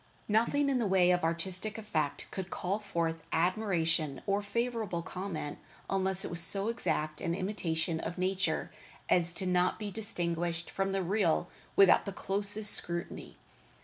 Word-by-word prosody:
Nothing 235 +7 +2
in 270 -2 +2
the 230 - +1
way 185 -2 +4
of 180 -1 +1
artistic 180 +6 -1
effect 160 -10 -2
could 190 -1 -5
call 190 +4 -2
forth 165 -5 -2
admiration 165 -5 +1
or 200 +1 +1
favorable 215 -4 -2
comment 180 -5 -5 0.3
unless 190 -1 +4
it - - -4
was 170 0 +3
so 195 +5 +3
exact 155 -9 -1
an 170 - -1
imitation 170 -4 -2
of 165 +2 -5
nature 190 +1 -1 0.4
as 175 -1 +4
to 190 - -2
not 180 0 +2
be 210 -2 -5
distinguished 175 -5 -2
from 195 0 -1
the 195 -1 0
real 180 -2 +1 0.3
without 195 -2 +6
the 200 - -4
closest 205 +2 +2
scrutiny. 170 0 -3
185 Hz, 150 wpm, -31 LUFS, 170-205 Hz, 0.4 s, without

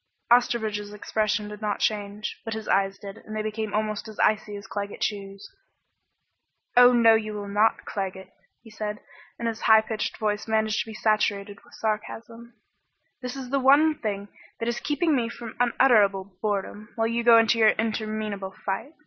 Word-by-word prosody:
Osterbridge's 220 -4 +2
expression 210 0 -1
did 210 0 -9
not 210 -1 -1
change 210 0 -2
but 225 -1 -4
his 220 -1 -6
eyes 195 0 +1
did, 200 0 -9
and 215 - -9
they 215 - -2
became 215 0 -3
almost 215 0 -2
as 215 - -10
icy 215 -1 +1
as 200 - -8
Claggett 205 -1 -5
Chew's. 195 -1 -4 1.3
"Oh 245 0 +8
no, 230 -2 +6
you 215 -1 -1
will 205 -1 -5
not, 210 +2 +1
Claggett," 190 -1 -5 0.3
he 225 - -14
said, 210 0 -5 0.4
and 235 - -3
his 225 -1 -3
high 220 0 +6
pitched 220 0 -4
voice 210 0 -2
managed 220 -1 +1
to - - -11
be 220 - -8
saturated 205 -1 0
with - - -17
sarcasm. 230 +2 -5 0.7
"This 250 +1 -5
is 260 -2 -7
the 275 - +2
one 285 +4 +5
thing 205 -7 -4 0.3
that 230 - -3
is 240 0 -1
keeping 305 +3 +1
me 235 -3 0
from 235 -1 -9
unutterable 205 -6 +3
boredom, 210 0 -3
while 225 - 0
you 235 +1 -1
go 235 -1 +7
into 230 0 +3
your 220 -1 +7
interminable 215 -3 -3
fight." 200 +10 -3
215 Hz, 175 wpm, -25 LUFS, 205-230 Hz, 1.3 s, Oh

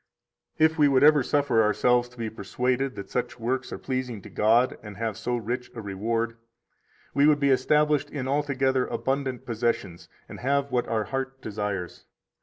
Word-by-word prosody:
152 160 0 +4
If 160 - -11
we 145 - +6
would 135 -1 +4
ever 150 -1 +7
suffer 140 -3 +2
ourselves 120 +3 +2
to 125 - -20
be 115 -1 -3
persuaded 125 +5 -2
that 100 -1 -8
such 125 - -2
works 130 +3 -2
are - - -4
pleasing 130 -4 -3
to - - -11
God 115 +4 +3
and 105 -3 -10
have 110 -2 -2
so 120 +3 -2
rich 120 +2 -4
a 115 - -5
reward, 115 +4 -2 0.8
we 140 +2 +4
would 150 -1 +4
be 140 -1 +3
established 150 +2 +2
in 135 -3 -4
altogether 135 -2 +1
abundant 130 -1 -2
possessions 115 -7 -2 0.2
and - - -10
have 140 +2 0
what 120 -1 0
our 110 -1 0
heart 135 +2 -4
desires. 105 -4 -4
125 Hz, 180 wpm, -26 LUFS, 115-135 Hz, 0.8 s, ever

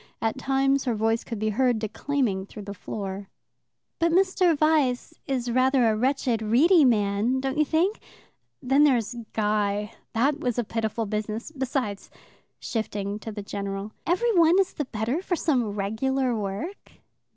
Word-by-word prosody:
At 225 0 -1
times 270 0 +1
her 240 -3 0
voice 225 +1 +1
could 230 - -5
be 215 +1 0
heard 245 +2 +2
declaiming 215 -2 -1
through 210 - -9
the 200 0 -6
floor. 195 0 -6 0.7
"But 335 0 +2
Mr. 365 -2 +3
Vyse 295 -5 +2
is 250 -3 -1
rather 255 0 +3
a 220 - +2
wretched, 250 -1 0
weedy 295 - +5
man, 220 +1 +2
don't 270 +3 -2
you 305 - +4
think? 345 +8 +1 0.6
Then 270 +3 +4
there's 245 -6 +2 0.2
Guy. 210 -1 0 0.2
That 275 +6 +1
was 250 -5 -2
a 240 - +1
pitiful 225 0 -2
business. 215 +5 -4
Besides" 260 -7 -3 0.5
shifting 205 -2 -3
to 220 - -7
the 205 -1 -6
general 200 +1 -5
" - - -17
every 460 +5 +2
one 340 +1 +5
is 385 - +1
the 295 - -3
better 235 +7 -2
for 370 -1 -1
some 270 -9 +1
regular 245 +5 0
work." 210 - -5
240 Hz, 160 wpm, -26 LUFS, 210-280 Hz, 0.7 s, weedy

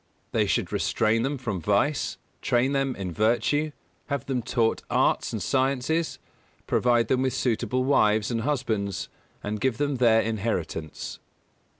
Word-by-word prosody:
They - - +2
should - - 0
restrain 110 +1 +1
them 135 +4 -1
from 110 -9 -3
vice, 105 - +1 0.2
train 125 +3 +2
them 135 -2 0
in 95 -3 -4
virtue; 120 - +1 0.4
have 140 -2 -2
them 130 -3 -1
taught 115 -1 +1
arts - - +2
and - - -3
sciences; 135 +5 0 0.5
provide 120 -2 +2
them 130 +1 +2
with 130 -1 +1
suitable 125 +1 0
wives 110 -5 +3
and 115 -1 0
husbands, 110 -8 -1 0.3
and 105 0 -3
give 130 -4 +1
them 145 -2 0
their 115 -2 +5
inheritance. 95 -9 -3
120 Hz, 140 wpm, -26 LUFS, 110-135 Hz, 0.5 s, their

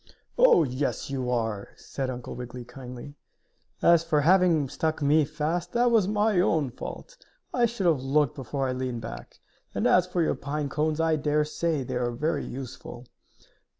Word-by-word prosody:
"Oh, - - +6
yes 135 +1 -2
you 130 -2 -2
are!" 110 -4 -1
said 135 -2 -5
Uncle 125 -1 -6
Wiggily, 125 0 -7
kindly. 125 +2 -9 0.7
"As 170 -1 +6
for 155 -3 +1
having 170 -3 +4
stuck 155 +4 -2
me 150 +1 +3
fast, 155 +3 -3
that 240 0 +3
was 220 -5 +4
my 210 -1 +2
own 155 -7 +2
fault. - - -8 0.4
I 240 -2 +3
should 225 -4 -4
have 160 -6 +3
looked 140 +1 +2
before 135 +1 -3
I - - -1
leaned 125 -2 -3
back. 115 +1 -9 0.4
And, - - 0
as 180 0 +4
for 180 -2 0
your - - +1
pine 145 +1 -3
cones, 155 +2 -1
I 165 -1 +2
dare 150 0 +1
say 155 -1 -1
they 125 - -3
are 120 -1 0
very 145 +5 -1
useful." 125 -1 -8
150 Hz, 175 wpm, -27 LUFS, 130-165 Hz, 0.7 s, Oh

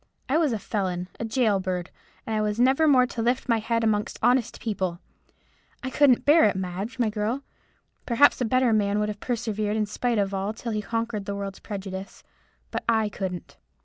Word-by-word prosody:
I 285 +4 +2
was 310 -5 +2
a 225 - 0
felon, 185 -3 -3
a 230 - -2
gaol 220 -3 +2
bird; 185 -2 -3 0.3
and 220 - -2
I 215 - +1
was 210 +1 -1
never 265 +5 +4
more 260 -4 +6
to 240 -2 -5
lift 245 +3 0
my 230 -2 +3
head 230 +1 -1
amongst 210 -2 0
honest 245 -2 +2
people. 190 -6 -2 0.8
I 260 - -3
couldn't 275 -4 +4
bear 305 +3 +6
it, 205 - +2
Madge, 190 +6 -4
my 235 -4 +1
girl. 220 +6 -2 0.6
Perhaps 255 +3 +4
a - - +2
better 255 0 +3
man 205 -1 +2
might 210 0 0
have 205 -1 -5
persevered 215 -3 -2
in 215 - +1
spite 235 +3 -1
of 200 -1 0
all 195 +2 -2
till 230 +1 -5
he 215 -1 -1
conquered 230 -2 -3
the 200 - -3
world's 200 -1 -5
prejudice. 195 -2 -7 0.5
But - - -3
I 220 -2 +2
couldn't. 185 -4 -6
215 Hz, 200 wpm, -26 LUFS, 200-240 Hz, 0.8 s, more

